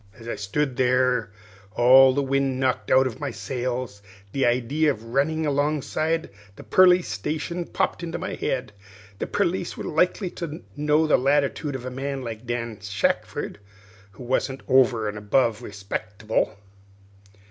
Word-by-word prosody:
"As 115 - -12
I - - -3
stood 125 +6 -2
there 125 -3 +2 0.4
with - - -30
all 130 +2 +7
the 140 - +1
wind 135 -1 0
knocked 130 -1 0
out 130 +1 +5
of 125 -4 -4
my 145 -2 -3
sails, 120 -1 -4 0.3
the 135 +1 +1
idee 130 +6 +1
of 130 -7 0
runnin' 145 +7 0
alongside 150 +2 0 0.2
the - - -11
perlice 180 -4 +5
station 150 - -3
popped - - -1
into 170 -1 -4
my - - -4
head. 130 -4 -2 0.5
The - - -2
perlice 175 0 -1
was - - -5
likely 180 +3 +1
to 160 -2 -6
know 150 +2 +2
the 155 - +4
latitude 140 +1 +1
of 130 -1 -6
a 130 - -4
man 135 +1 -4
like 115 0 -7
Dan 115 -2 -3
Shackford, 100 -2 -2 0.5
who 100 - -11
wasn't 130 +2 -1
over 125 -4 +4
an' 105 0 -4
above 110 +2 +1
respecktible. 105 0 -3
130 Hz, 155 wpm, -24 LUFS, 115-150 Hz, 0.5 s, all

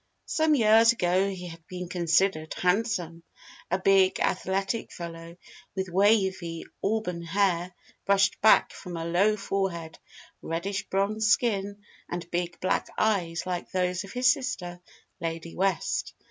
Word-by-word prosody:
Some 315 -1 +2
years 225 -1 +6
ago 185 -2 +1
he 180 -2 -6
had 165 0 -12
been 180 -1 -6
considered 170 -1 +1
handsome: 180 -3 0 0.5
a 185 - +1
big, 190 0 +3
athletic 195 +4 -1
fellow 170 0 -8 0.4
with 190 -1 -2
wavy 190 -3 +1 0.2
auburn 195 -5 -1
hair 180 0 0 0.3
brushed 195 -1 +3
back 220 - +5
from 180 -3 -8
a 165 - -4
low 195 +6 +2
forehead, 190 -5 -3 0.4
reddish 195 +4 -3
bronze 210 +3 0
skin, 205 -2 +1 0.3
and 175 -1 -5
big 175 0 -2
black 185 - 0
eyes 170 -6 0
like 180 -1 -3
those 180 0 -1
of 195 - -11
his 255 +1 +4
sister, 180 -10 -5 0.4
Lady 165 0 -5
West. 190 -2 -1
185 Hz, 135 wpm, -27 LUFS, 170-200 Hz, 0.5 s, years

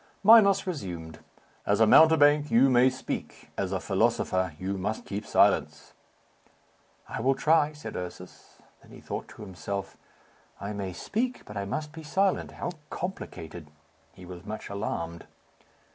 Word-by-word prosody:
Minos 200 -2 +7
resumed, 90 - -6 0.4
"As 100 +1 +1
a 110 - +6
mountebank, 150 +2 +6
you 130 +3 +5
may 125 +1 +5
speak; 130 0 -6
as - - -2
a - - -1
philosopher, 95 -3 0
you 95 +3 -3
must 105 +3 -3
keep 100 +2 -5
silence." - - +2 1.1
"I - - -5
will 135 +3 +2
try," 150 +1 +3
said 150 -8 -8
Ursus. 90 0 -9 0.2
Then - - -20
he - - -11
thought - - -6
to - - -11
himself. 100 0 -6 0.6
"I 100 +2 -5
may 100 -2 -4
speak, 245 - -3
but 105 - -10
I 100 0 -3
must 150 +9 -4
be 160 +1 -9
silent. 190 +6 0
How - - -4 0.2
complicated." 85 - -6 0.4
He 90 - -14
was 90 -1 -10
much 110 +1 -7
alarmed. 85 -5 -4
110 Hz, 145 wpm, -28 LUFS, 95-150 Hz, 1.1 s, Minos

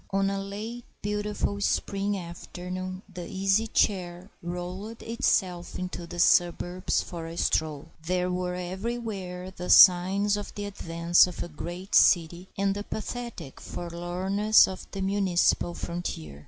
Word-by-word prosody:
ON 195 0 +1
a 195 - -2
late 215 +5 -6 0.2
beautiful 205 0 -2
spring 200 0 0
afternoon 185 +2 -6
the 180 -3 -8
Easy 195 +3 +1
Chair 185 -3 0
rolled 180 +6 -6
itself 185 -6 0
into 180 -2 -5
the 175 - -8
suburbs 175 +1 +2
for 165 -2 -7
a 165 +1 -8
stroll. 155 -2 0 0.2
There 180 0 0
were 180 0 -2
everywhere 190 -1 -4
the 180 -1 -7
signs 195 +3 +7
of 205 - -7
the 205 - -4
advance 170 -3 +3
of 180 - -5
a - - -6
great 175 +4 -7
city 175 +1 +4
and 195 0 +1
the 205 +1 -4
pathetic 220 - -6
forlornness 180 +5 +2
of 190 - -7
the 195 -1 -4
municipal 190 -3 +2
frontier. 80 - -5
185 Hz, 135 wpm, -27 LUFS, 175-200 Hz, 0.2 s, signs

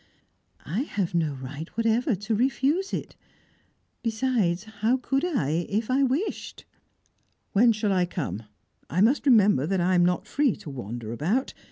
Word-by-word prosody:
"I 170 +9 -2
have 200 - -2
no 160 -4 0
right 140 +4 -7
whatever 230 +2 +2
to 210 +4 -3
refuse 275 - +1
it. - - -4 0.9
Besides, 220 -6 0
how 220 +3 0
could 270 +2 -1
I, 170 - 0
if 215 +4 -1
I 265 +2 +3
wished? 275 - -2 0.9
"When 230 +4 +5
shall 210 -2 0
I 180 -1 +2
come? 155 - -4 0.5
I 175 +5 +1
must 265 +7 +3
remember 205 - +5
that 190 +1 0
I 180 +2 +2
am 175 -1 +4
not 180 +2 +1
free 270 +2 +1
to 150 - -9
wander 120 -3 -6
about. 190 - -1
210 Hz, 155 wpm, -26 LUFS, 170-255 Hz, 0.9 s, When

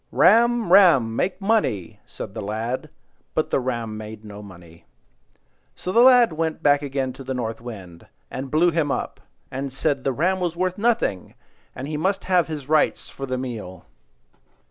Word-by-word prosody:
"Ram, 230 -1 +4
ram! 135 - +6
Make 185 +10 -1
money!" 195 - 0
said 95 - -8
the 110 - -5
lad; 115 +8 -3 0.5
but 155 - 0
the - - +2
ram 120 -4 -3
made 110 0 -9
no 105 0 -9
money. 85 -5 -15 0.9
So 180 - -4
the 230 - +5
lad 245 -6 +6
went 160 0 -2
back 145 0 +4
again 135 -2 -2
to 135 - -10
the 130 0 -4
North 115 -2 -4
Wind, 95 -8 -10 0.2
and 135 +1 -5
blew 165 +5 +3
him 155 -3 0
up, - - -3 0.3
and 135 +1 -4
said 140 0 -1
the 135 - +1
ram 180 +8 0
was 175 -2 -2
worth 185 +2 -1
nothing, 225 - 0 0.4
and 135 - -6
he 150 0 -3
must 190 +5 0
have 180 -2 +2
his 150 -4 -6
rights 155 0 +1
for 135 - -6
the 130 0 -2
meal. 115 -8 -6
135 Hz, 175 wpm, -23 LUFS, 115-175 Hz, 0.9 s, ram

